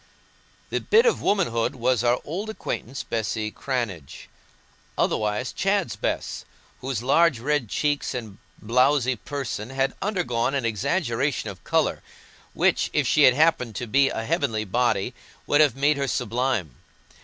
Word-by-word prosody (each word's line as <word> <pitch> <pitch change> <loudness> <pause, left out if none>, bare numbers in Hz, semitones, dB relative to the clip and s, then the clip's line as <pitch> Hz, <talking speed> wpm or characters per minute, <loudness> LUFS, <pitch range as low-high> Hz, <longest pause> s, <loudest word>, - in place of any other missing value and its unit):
The - - 0
"bit 455 +2 +4
of 475 - +2
womanhood" 150 - +1
was 125 -1 +1
our 120 +1 +3
old 190 +8 -4
acquaintance 135 - -5
Bessy 110 -1 -2
Cranage, 115 - -4 0.7
otherwise 105 +4 0
Chad's 195 -2 0
Bess, - - -3 0.4
whose 125 -3 -3
large 155 +2 +4
red 140 -2 0
cheeks 145 +2 -1
and 110 -5 -7 0.2
blowsy 125 +3 +2
person 125 -2 -5
had 135 0 0
undergone 165 - 0
an 135 -4 -1
exaggeration 120 - -1
of 95 - -15
colour, - - +1 0.5
which, - - +2
if - - +2
she 150 - +5
had 125 - +6
happened 140 -7 +2
to 125 - -3
be 135 +4 +3
a 110 - -4
heavenly 120 -8 0
body, 120 +1 0 0.3
would 145 - +4
have 150 -3 +4
made 140 +2 +2
her 140 -1 -1
sublime. 120 - -1
125 Hz, 145 wpm, -24 LUFS, 115-145 Hz, 0.7 s, had